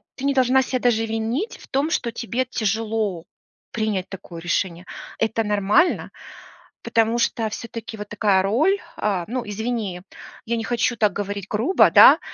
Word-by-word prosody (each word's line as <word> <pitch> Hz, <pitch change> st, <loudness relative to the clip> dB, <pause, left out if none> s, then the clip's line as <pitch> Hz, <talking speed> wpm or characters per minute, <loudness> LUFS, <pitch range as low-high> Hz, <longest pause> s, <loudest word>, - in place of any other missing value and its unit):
ты 275 Hz, -, -6 dB
не 280 Hz, -, +2 dB
должна 260 Hz, 0 st, +4 dB
ся 255 Hz, 0 st, -2 dB
даже 230 Hz, -2 st, +2 dB
винить 225 Hz, -, -2 dB
в -, -, -16 dB
том, 275 Hz, +4 st, 0 dB
что 235 Hz, -, -1 dB
тебе 240 Hz, +2 st, -2 dB
тяжело 215 Hz, -5 st, -2 dB, 0.5 s
принять 210 Hz, -4 st, -2 dB
такое 175 Hz, -3 st, -9 dB
решение. 175 Hz, 0 st, -2 dB, 0.3 s
Это 225 Hz, 0 st, 0 dB
нормально, 210 Hz, -, +2 dB, 0.7 s
потому 225 Hz, +1 st, +1 dB
что 230 Hz, -1 st, 0 dB
всё-таки 230 Hz, +1 st, -7 dB
вот 210 Hz, 0 st, -7 dB
такая 205 Hz, -2 st, +2 dB
роль, 295 Hz, -, +2 dB, 0.2 s
а, 195 Hz, -4 st, -1 dB
ну, 245 Hz, +1 st, -3 dB
извини, 210 Hz, -3 st, -3 dB, 0.4 s
я 235 Hz, +1 st, -1 dB
не 225 Hz, -, -3 dB
хочу 240 Hz, +1 st, 0 dB
так 210 Hz, -3 st, +2 dB
говорить 200 Hz, -1 st, -4 dB
грубо, 235 Hz, -, +3 dB
да, -, -, +9 dB
225 Hz, 155 wpm, -22 LUFS, 205-240 Hz, 0.7 s, да